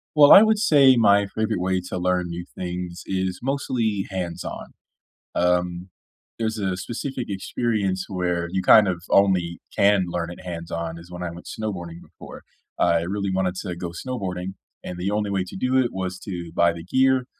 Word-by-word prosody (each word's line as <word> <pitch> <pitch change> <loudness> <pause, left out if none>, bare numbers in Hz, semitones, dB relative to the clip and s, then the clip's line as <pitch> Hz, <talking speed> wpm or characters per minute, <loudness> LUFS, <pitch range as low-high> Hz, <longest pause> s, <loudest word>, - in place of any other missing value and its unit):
Well, 145 -1 +8
I 200 - +11
would 220 -1 +4
say 145 - +6
my 100 -3 +4
favorite 110 -1 -2
way 95 0 0
to - - -3
learn 90 -1 0
new 85 +1 -5
things 90 0 -5
is 95 -1 -2
mostly 120 -7 -1
hands-on. 90 -3 -5 0.6
Um, 90 +1 0 0.5
there's 110 -1 -2
a 95 -2 -1
specific 125 +5 -4
experience 100 -1 -1
where 90 -3 -1
you 95 - 0
kind 105 +2 +7
of 90 -2 -2
only 90 -4 +3 0.2
can 100 -2 +4
learn 85 -1 -3
it 90 - -10
hands-on, 85 -1 -5
is 85 - -14
when 90 0 -6
I 85 - -3
went 85 +1 -11
snowboarding 90 -6 -5
before. - - -13 0.4
Uh, - - +3
I 85 -1 +3
really 100 +3 -2
wanted 95 -1 0
to 90 -2 -4
go 85 0 -5
snowboarding, 95 -2 -5 0.3
and 90 0 -6
the 90 +2 -1
only 105 0 -1
way 95 -2 0
to - - -9
do 130 +1 +1
it 130 -2 +3
was 95 -1 -4
to 85 -4 -6
buy 85 0 +4
the 85 -1 -8
gear, 130 +6 +2
95 Hz, 185 wpm, -23 LUFS, 90-110 Hz, 0.6 s, I